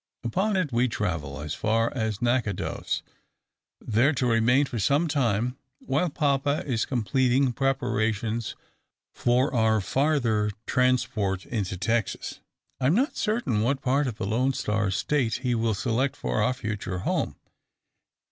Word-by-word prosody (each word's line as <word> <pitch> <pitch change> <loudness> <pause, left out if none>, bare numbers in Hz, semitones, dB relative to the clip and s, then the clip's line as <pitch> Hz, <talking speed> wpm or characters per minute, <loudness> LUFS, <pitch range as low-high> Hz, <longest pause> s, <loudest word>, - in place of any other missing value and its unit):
Upon 195 - 0
it 170 -7 0
we 120 +2 +3
travel, 80 - -3
as 75 +1 -4
far 115 +1 +1
as 110 -3 -2
Natchitoches. 120 -5 -1 0.8
There 120 +7 +2
to 130 -2 0
remain 120 +4 +3
for 120 -4 -4
some 140 - +2
time, 125 -4 0 0.2
while 145 +7 0
papa 140 -1 +1
is 120 -5 0
completing 130 +2 +1
preparations 115 -4 -1 0.6
for 125 +4 +1
our 110 -2 +3
farther 120 -3 +1 0.2
transport 110 -7 +1
into 100 -6 -3
Texas, 110 +2 -1 0.4
I 130 - +2
am 155 - +4
not 265 +6 +1
certain 215 - 0
what 135 +4 0
part 135 +2 +2
of 115 -4 -4
the - - -3
`Lone 125 +6 +1
Star' 105 -1 0
State 110 - 0
he 125 -1 +1
will 115 -2 +1
select 125 +7 0
for 110 - -1
our 125 - +2
future 105 -6 -4
home. - - 0
120 Hz, 140 wpm, -26 LUFS, 110-135 Hz, 0.8 s, am